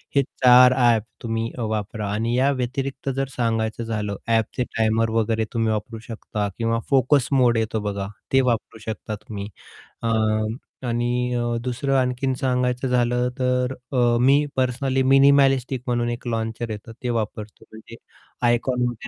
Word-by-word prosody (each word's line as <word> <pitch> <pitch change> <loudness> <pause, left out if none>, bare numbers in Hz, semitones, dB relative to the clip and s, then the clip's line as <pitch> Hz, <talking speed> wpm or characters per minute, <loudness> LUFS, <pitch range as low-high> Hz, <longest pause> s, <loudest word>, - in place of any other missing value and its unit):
हे 140 - +5
4 125 0 +6
ॲप 120 -3 +4
अ, - - -23 0.2
तुम्ही 115 0 -2
वापरा 110 -2 -3
आणि 115 +3 -1
या 135 +2 +3
व्यतिरिक्त 135 +1 -3
जर 135 0 -1
सांगायचं 115 -1 -1
झालं 105 -3 -3
ॲपचे 115 +2 +1
टायमर 110 0 +2
वगैरे 110 0 0
तुम्ही 115 -1 +1
वापरू 110 +2 -4
शकता 105 -2 -3
किंवा 115 0 0
फोकस 135 -1 +3
मोड 125 -4 +4
येतो 110 0 -1
बघा, 100 -1 -4 0.3
ते 135 - +6
वापरू 120 -3 -1
शकता 110 -1 -6
तुम्ही. 105 -1 -7 0.6
अ, 115 - 0 0.8
आणि 120 +1 0
अ, 120 -1 -1
दुसरं 130 +2 -1
आणखीन 130 +1 -1
सांगायचं 125 0 0
झालं 125 0 +1
तर 125 0 0 0.2
अ, - - -1 0.2
मी 140 +4 +4
पर्सनली 130 +1 +1
मिनिमॅलिस्टिक 135 -1 +4
म्हणून 120 -1 0
एक 120 +1 -6
लॉन्चर 115 0 -3
येतं 110 +2 -7
ते 125 - -1
वापरतो 110 -2 -4
म्हणजे 110 +1 -12 0.5
आयकॉन 125 +1 +1
म्हण 120 0 -1
120 Hz, 150 wpm, -23 LUFS, 115-130 Hz, 0.8 s, 4